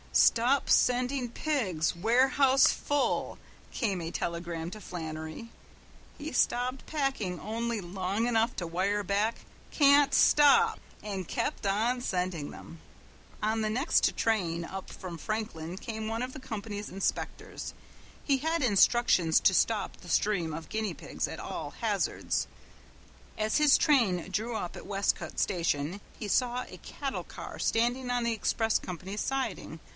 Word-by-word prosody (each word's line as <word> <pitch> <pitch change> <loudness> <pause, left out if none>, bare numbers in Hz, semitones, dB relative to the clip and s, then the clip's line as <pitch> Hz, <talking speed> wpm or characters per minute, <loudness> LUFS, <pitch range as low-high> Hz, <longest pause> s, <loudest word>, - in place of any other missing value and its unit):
"Stop 250 +4 +4
sending 250 0 +2
pigs. 220 - -1
Warehouse 260 +6 +4
full," 290 -1 -1 0.3
came 200 -8 -1
a 165 0 -4
telegram 170 -1 -3
to 215 - -8
Flannery. 160 +4 -6 0.7
He 305 +1 -6
stopped 250 +2 +1
packing 270 - -2
only 230 +3 -2
long 190 +4 -2
enough 230 0 +2
to 175 - -3
wire 195 +5 0
back, 205 +4 0 0.3
"Can't 285 -1 +5
stop," 440 +10 +5 0.2
and 195 -4 -5
kept - - -2
on 225 +6 +1
sending 180 -8 -2
them. 165 - -11 0.6
On 220 +1 +1
the 215 - 0
next 255 +8 +2
train 170 -7 0
up 190 +1 -7
from 180 -3 -8
Franklin 185 -3 -4
came 220 +1 -5
one 225 +2 -2
of 255 +1 -5
the 265 - -8
company's 210 -4 -5
inspectors. 195 +1 -3 0.5
He 275 -2 +2
had 320 +2 0
instructions 205 -6 +4
to 190 - +5
stop 215 +3 +1
the 175 - -13
stream 180 -4 +1
of 160 0 -6
guinea 215 0 -2
pigs - - -4
at - - -7
all - - -5
hazards. - - -1 0.9
As 215 0 +1
his 300 -2 +6
train 220 - +2
drew 220 +4 -2
up 180 -5 -5
at - - -9
Westcote 200 0 -1
station 170 0 0 0.2
he 215 - -4
saw 250 +3 +1
a - - -11
cattle 275 -2 -5
car - - -9
standing 245 +3 +1
on 245 -1 +1
the 235 0 +1
express 225 0 +1
company's 185 +3 -6
siding. 270 -1 -3
215 Hz, 140 wpm, -29 LUFS, 185-250 Hz, 0.9 s, his